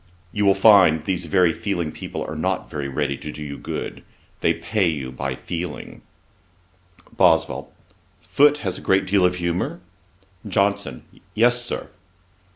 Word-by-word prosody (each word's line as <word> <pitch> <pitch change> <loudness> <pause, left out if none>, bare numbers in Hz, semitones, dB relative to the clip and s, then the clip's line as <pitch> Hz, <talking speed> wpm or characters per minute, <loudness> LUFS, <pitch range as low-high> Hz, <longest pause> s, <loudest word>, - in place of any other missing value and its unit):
You 105 +2 0
will 100 - +5
find 95 -7 +6
these 90 -2 -1
very 85 0 +3
feeling 85 -6 -2
people - - -6
are - - -5
not - - -2
very 70 -2 -3
ready 70 0 -2
to 75 - -7
do 75 - -8
you 70 -1 -6
good. - - -6 0.4
They - - +2
pay 105 -5 0
you 70 -6 -3
by 65 0 -4
feeling.' 85 +3 -6 1.1
BOSWELL. - - +2 0.5
'Foote 145 +6 +3
has 95 - -2
a - - -12
great 95 0 +2
deal 100 -1 +2
of 90 0 +3
humour?' 85 0 -2 0.7
JOHNSON. 100 -9 0 0.3
'Yes, 120 +2 +3
Sir.' 120 - -5
90 Hz, 150 wpm, -22 LUFS, 75-100 Hz, 1.1 s, find